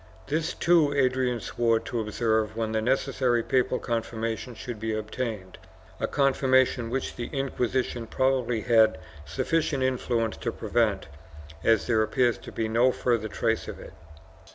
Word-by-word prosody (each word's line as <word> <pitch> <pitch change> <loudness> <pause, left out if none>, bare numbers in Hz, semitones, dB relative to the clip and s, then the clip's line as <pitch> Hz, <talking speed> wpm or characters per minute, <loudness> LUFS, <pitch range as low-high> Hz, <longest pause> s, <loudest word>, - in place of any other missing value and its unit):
This, 160 +2 -1
too, 170 -4 +4
Adrian 130 -3 +1
swore 115 0 +1
to 120 - -4
observe 110 0 0
when 110 -1 -1
the 110 0 0
necessary 125 -1 +1
papal 130 0 +1
confirmation 115 +1 -3
should 120 -1 -7
be 110 0 -2
obtained 110 -3 -5 0.2
— - - -24
a - - 0
confirmation 130 -3 +2
which 130 +2 -3
the 120 - -4
Inquisition 130 -3 -2
probably 130 -3 +1
had 110 -6 +4 0.3
sufficient 140 - 0
influence 120 -3 0
to 115 - -3
prevent, 110 -3 0 0.6
as 115 -2 +3
there 110 -2 +2
appears 120 +2 +1
to - - -10
be 110 - -2
no 120 +4 +3
further 120 -4 0
trace - - -1
of - - -7
it. - - -11
120 Hz, 150 wpm, -27 LUFS, 110-130 Hz, 0.6 s, too